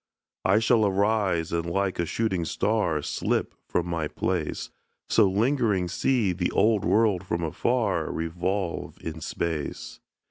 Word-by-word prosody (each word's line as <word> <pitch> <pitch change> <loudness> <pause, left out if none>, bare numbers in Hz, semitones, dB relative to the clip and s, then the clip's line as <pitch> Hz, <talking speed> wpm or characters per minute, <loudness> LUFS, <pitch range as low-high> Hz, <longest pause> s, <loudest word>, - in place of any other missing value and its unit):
I 95 +2 +5
shall 115 0 +3
arise, 100 -4 +1
and 85 0 -1
like 95 0 -1
a 85 - 0
shooting 95 -5 0
star 85 -4 0
Slip - - -1
from 85 - 0
my 85 -3 -2
place; 85 0 -2 0.4
So 100 - +5
lingering 105 -3 +1
see 110 -1 +1
the 90 0 -1
old 105 0 +3
world 105 -4 +3
from 85 -2 -2
afar 110 - 0
Revolve 85 +3 -3
in 80 -1 -6
space. 80 -2 -4
95 Hz, 135 wpm, -26 LUFS, 85-110 Hz, 0.4 s, I